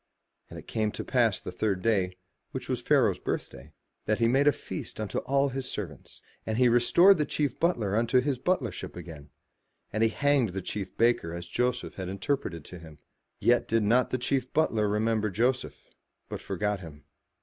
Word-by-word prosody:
And - - -9
it - - -10
came 110 -1 -1
to - - -5
pass 115 -6 +2
the - - -7
third 95 0 -1
day, 95 -5 +1 0.4
which - - -5
was - - -2
Pharaoh's - - +3
birthday, 70 +6 -5 0.3
that 110 - +1
he 115 - +3
made 135 +4 +3
a - - +8
feast 120 - -7
unto 105 -3 -2
all 140 +2 +1
his 130 0 -4
servants. 80 -9 -7 0.2
And 110 0 -2
he 125 0 +5
restored 170 +11 +5
the 150 - +2
chief 145 -5 -1
butler 115 - +1
unto 115 +3 +3
his 130 -1 -1
butlership 130 - -2
again; 80 -4 -10 0.6
but 110 - -2
he 115 - +5
hanged 135 -4 +2
the 95 - -3
chief 95 0 -5
baker 115 -8 +2
as 85 0 -6
Joseph 125 +7 -1
had 95 -2 -4
interpreted 95 - -3
to 90 - -10
him. 80 -2 -13 0.4
Yet - - +3
did 115 0 +2
not 120 +5 +3
the 130 - 0
chief 130 0 -1
butler 110 -9 +2
remember 110 +1 +1
Joseph, 120 +6 -1 0.5
but - - -5
forgat 105 -1 -2
him. 75 -5 -11
110 Hz, 185 wpm, -28 LUFS, 95-130 Hz, 0.6 s, a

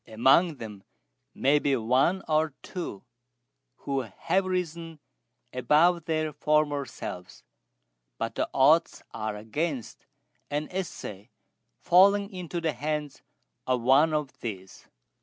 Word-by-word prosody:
Among 135 +9 +4
them 105 -6 -9 0.5
may 140 +3 +3
be 140 -2 +1
one 130 +10 +2
or 155 -2 +1
two 170 - -6 0.8
who 140 -1 -1
have 165 - -1
risen 170 -3 -3 0.5
above 155 +7 +3
their 155 -2 -1
former 150 -1 +1
selves, 90 0 -8 0.7
but - - -3
the - - -2
odds 155 +5 +3
are 110 -1 -3
against 125 +5 -4 0.4
an 150 +1 -2
essay 130 - -6 0.5
falling 200 +3 +5
into 180 -2 -4
the 160 -2 -1
hands 150 +2 -4 0.5
of 130 -2 +1
one 140 +6 +5
of 150 -3 -3
these." 95 -5 -8
150 Hz, 115 wpm, -27 LUFS, 125-165 Hz, 0.8 s, falling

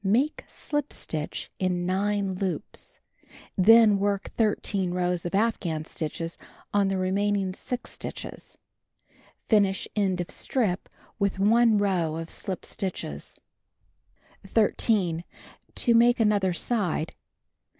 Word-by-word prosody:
— - - -40
Make 245 +10 +1
slip 295 -1 -3
stitch 155 -2 -4
in 180 -1 0
9 200 +1 0
loops. 185 0 -5 0.6
Then 215 +1 +7
work 200 -1 -1
13 200 -4 0
rows 180 -1 0
of 175 - -3
afghan 185 -8 0
stitches 165 +1 -4 0.3
on 200 -1 +3
the 195 0 0
remaining 195 +1 0
6 250 +6 -5
stitches. - - -7 0.9
Finish 200 -3 +3
end 195 -4 +1
of 175 - -3
strip 205 -8 -1 0.3
with 200 -1 +1
1 220 +2 +4
row 180 -6 +1
of 165 0 -5
slij) 190 -3 -4
stitches. 180 - -4 1.0
13. 195 -4 +1 0.5
To 240 - +3
make 240 +2 +5
other 205 -4 +3
side. 180 -5 -1
195 Hz, 115 wpm, -27 LUFS, 180-215 Hz, 1.0 s, Then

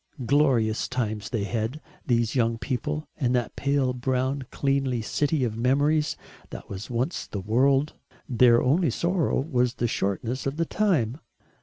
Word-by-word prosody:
Glorious 125 -5 +2
times 110 -4 -3
they 110 -4 -1
had, 115 +6 -2 0.3
these 115 -3 +1
young 115 -3 +1
people, 150 +5 -3
in 125 -5 +1
that 120 -3 -1
pale 140 -2 +1
brown 130 +1 -1
cleanly 135 -4 0
city 145 +4 0
of 115 -3 -1
memories 145 +6 +1 0.3
that - - -9
was 100 +2 -7
once 125 +7 -2
the 100 - -5
world. 135 +8 +2 0.3
Their 120 -2 +5
only 155 +6 +3
sorrow 170 -2 0
was 125 -4 0
the 120 - 0
shortness 115 +6 -2
of 135 +2 -3
the 165 - +1
time. 155 - 0
125 Hz, 150 wpm, -26 LUFS, 115-145 Hz, 0.3 s, Their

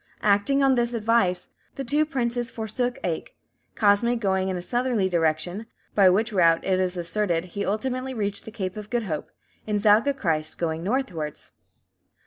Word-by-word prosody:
Acting 210 +7 +3
on 270 -1 +5
this 240 -1 0
advice, 215 -5 +1 0.3
the 275 - -4
two 295 +4 +1
princes 240 -4 -1
forsook 235 +3 -2
Aich; 165 -3 -3 0.4
Cosme 215 +3 +4
going 190 -4 0
in 185 - -2
a - - -3
southerly 240 -3 0
direction, 175 +4 0 0.3
by 195 -3 +6
which 215 +5 +1
route, 165 -3 +4
it 185 -1 +2
is 185 -1 -1
asserted, 175 0 -1
he 200 - -2
ultimately 255 +5 -2
reached 205 -2 -3
the - - -7
Cape 190 -3 -4
of 210 0 -7
Good 240 -1 0
Hope; 155 -7 -4 0.4
and 210 -1 0
Zaga 220 +7 +4
Christ 160 - -1
going 160 -1 -2
northwards. 185 - -3
210 Hz, 165 wpm, -25 LUFS, 180-240 Hz, 0.4 s, by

